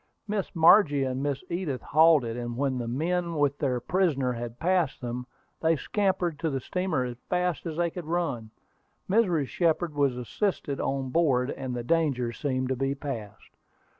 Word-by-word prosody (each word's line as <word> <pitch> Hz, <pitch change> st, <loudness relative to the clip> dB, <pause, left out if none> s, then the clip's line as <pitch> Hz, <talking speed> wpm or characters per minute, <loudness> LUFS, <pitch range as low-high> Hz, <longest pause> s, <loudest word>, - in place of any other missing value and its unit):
Miss 205 Hz, -3 st, -3 dB
Margie 160 Hz, -4 st, +6 dB
and 130 Hz, 0 st, -2 dB
Miss 140 Hz, +1 st, -2 dB
Edith 170 Hz, -7 st, -3 dB
halted, 155 Hz, -7 st, +4 dB
and 120 Hz, -1 st, -4 dB
when 135 Hz, -2 st, 0 dB
the 120 Hz, -, -3 dB
men 170 Hz, +7 st, -1 dB
with 145 Hz, -1 st, +1 dB
their 130 Hz, -4 st, 0 dB
prisoner 140 Hz, -5 st, +1 dB
had 120 Hz, 0 st, -6 dB
passed 175 Hz, -4 st, +1 dB
them, 125 Hz, 0 st, -5 dB, 0.3 s
they 165 Hz, 0 st, +3 dB
scampered 185 Hz, -2 st, -1 dB
to 160 Hz, -, 0 dB
the 135 Hz, -2 st, -2 dB
steamer 180 Hz, 0 st, -1 dB
as 125 Hz, -1 st, -5 dB
fast 180 Hz, -1 st, 0 dB
as 160 Hz, -1 st, -5 dB
they 170 Hz, -1 st, +1 dB
could 175 Hz, -1 st, -7 dB
run. 160 Hz, -10 st, -2 dB, 0.6 s
Mrs. 185 Hz, -8 st, +2 dB
Shepard 170 Hz, -1 st, +1 dB
was 140 Hz, -4 st, +1 dB
assisted 140 Hz, -, -2 dB
on 135 Hz, -1 st, -1 dB
board, 135 Hz, -5 st, +2 dB
and 130 Hz, -2 st, -5 dB
the 120 Hz, -, -3 dB
danger 135 Hz, -4 st, +1 dB
seemed 130 Hz, +2 st, -2 dB
to 130 Hz, -, +1 dB
be 135 Hz, +2 st, -1 dB
passed. 125 Hz, -8 st, -7 dB
145 Hz, 170 wpm, -27 LUFS, 125-170 Hz, 0.6 s, Margie